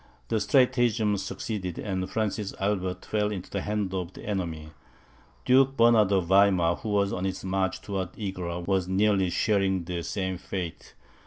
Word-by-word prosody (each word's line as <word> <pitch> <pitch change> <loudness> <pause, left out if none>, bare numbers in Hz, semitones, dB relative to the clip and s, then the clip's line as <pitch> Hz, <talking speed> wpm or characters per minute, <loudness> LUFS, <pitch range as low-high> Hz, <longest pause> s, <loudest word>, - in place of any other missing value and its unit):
The 110 - +1
stratagem 120 -2 +3
succeeded, 95 -1 -4
and 95 -2 -3
Francis 105 -2 -2
Albert 95 -2 -1
fell 105 -1 0
into 95 -3 -6
the 100 - -2
hands 105 -2 -2
of 90 -1 -3
the - - -11
enemy. 85 -6 -3 0.7
Duke 135 +1 +4
Bernard 115 -3 +5
of 95 -3 +2
Weimar, 95 -2 +4
who 110 - -6
was 100 -1 +1
on 90 - -3
his 95 -1 -3
march 95 0 -1
towards 95 -3 -4
Egra, 90 -4 -4
was 95 -2 +1
nearly 95 0 +2
sharing 95 -2 +1
the 85 0 -4
same 95 0 -3
fate. 90 -4 -6
95 Hz, 160 wpm, -27 LUFS, 95-105 Hz, 0.7 s, Bernard